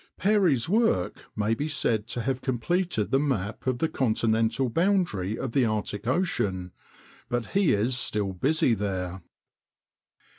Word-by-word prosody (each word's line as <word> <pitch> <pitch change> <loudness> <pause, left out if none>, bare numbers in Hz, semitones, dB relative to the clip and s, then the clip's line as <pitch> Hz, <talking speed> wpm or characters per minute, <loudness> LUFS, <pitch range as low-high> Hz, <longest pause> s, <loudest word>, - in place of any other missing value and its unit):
Peary's 185 - +2
work 190 - +1
may 105 +1 +1
be 145 +7 -2
said 110 -8 0
to 120 -1 -4
have 130 +1 -1
completed 130 - -1
the 135 - +4
map 115 -7 -2
of 130 -1 +1
the 160 - +1
continental 115 -1 +1
boundary 165 - +1
of 130 - -3
the 135 +1 +2
Arctic 105 -1 -2
Ocean, 100 - 0 0.6
but 120 -1 -1
he 195 -4 +3
is 120 +5 +2
still 105 -5 -1
busy 130 - +2
there. 95 -3 -3
120 Hz, 140 wpm, -27 LUFS, 105-150 Hz, 0.6 s, the